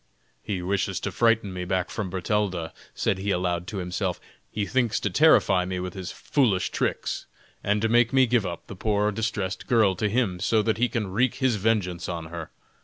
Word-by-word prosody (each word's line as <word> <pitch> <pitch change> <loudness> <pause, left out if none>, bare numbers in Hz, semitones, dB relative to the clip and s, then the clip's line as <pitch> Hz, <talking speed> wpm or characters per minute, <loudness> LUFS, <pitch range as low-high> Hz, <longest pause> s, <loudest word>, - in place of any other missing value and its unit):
"He 95 -4 -3
wishes 100 0 -1
to - - -2
frighten 115 -4 +2
me 90 0 -4
back 90 0 -1
from 105 -4 -3
Bertalda," 95 -2 -1 0.2
said 95 - 0
he 100 +2 -3
aloud 90 -2 0
to 100 - -5
himself; 90 0 -2 0.3
"he 105 -1 -2
thinks 120 -2 +1
to 100 - -2
terrify 100 - +5
me 90 0 -3
with 90 0 -4
his 95 -2 -6
foolish 110 -11 +1
tricks, - - -2 0.4
and 105 +1 +1
to - - +4
make 120 +1 +4
me 130 -1 +5
give 120 -2 +2
up 85 -3 -5
the - - -9
poor 105 +1 +1
distressed 105 -3 -3
girl 110 -5 +4
to 105 - 0
him, 100 -5 0
so 110 +4 +2
that 110 +1 0
he 125 0 +3
can 110 -4 -2
wreak 120 +5 +1
his 130 -5 +1
vengeance 95 -5 0
on 85 -2 -4
her. 85 -2 -6
100 Hz, 200 wpm, -26 LUFS, 90-115 Hz, 0.4 s, terrify